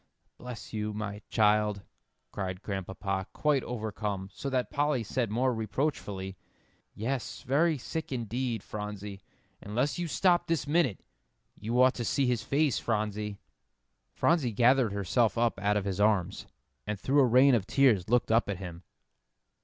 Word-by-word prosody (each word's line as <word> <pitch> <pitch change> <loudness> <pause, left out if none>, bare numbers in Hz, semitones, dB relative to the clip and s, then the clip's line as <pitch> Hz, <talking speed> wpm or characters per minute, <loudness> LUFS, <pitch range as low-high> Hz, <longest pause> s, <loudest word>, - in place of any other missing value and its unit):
"Bless 115 -8 -8
you, 105 0 -2
my 105 0 -5
child," 105 -2 +2 0.5
cried 95 -1 -4
Grandpapa, 95 -1 -3
quite 150 -3 +1
overcome, 105 -4 -4
so 140 - -4
that 130 -2 -1
Polly 145 -4 +1
said 115 +1 -1
more 125 +4 +1
reproachfully, 105 -5 -3 0.6
"Yes, 115 -1 -3
very 155 +5 +2
sick 160 +4 -5
indeed, 120 -2 -2
Phronsie, 105 -1 -6 0.4
unless 125 - -1
you 175 - -1
stop 175 +3 +2
this 165 -5 0
minute. 150 - +1 0.5
You 115 +4 -2
ought 130 +1 +6
to 120 - -4
see 135 +4 +1
his 125 -3 +1
face, 140 +4 +1
Phronsie." 105 -2 -2 0.8
Phronsie 150 -9 +2
gathered 120 +1 +4
herself 100 +2 +1
up 115 -3 +1
out 105 +1 +2
of 100 - -2
his 100 -1 -2
arms, 105 -4 +1 0.4
and 105 -1 -3
through 140 +7 +2
a 135 - +6
rain 130 +3 +6
of 110 -5 +1
tears 115 -9 +3
looked 120 -1 +2
up 115 -2 +3
at 100 - -2
him. 90 -2 -8
110 Hz, 150 wpm, -29 LUFS, 100-130 Hz, 0.8 s, ought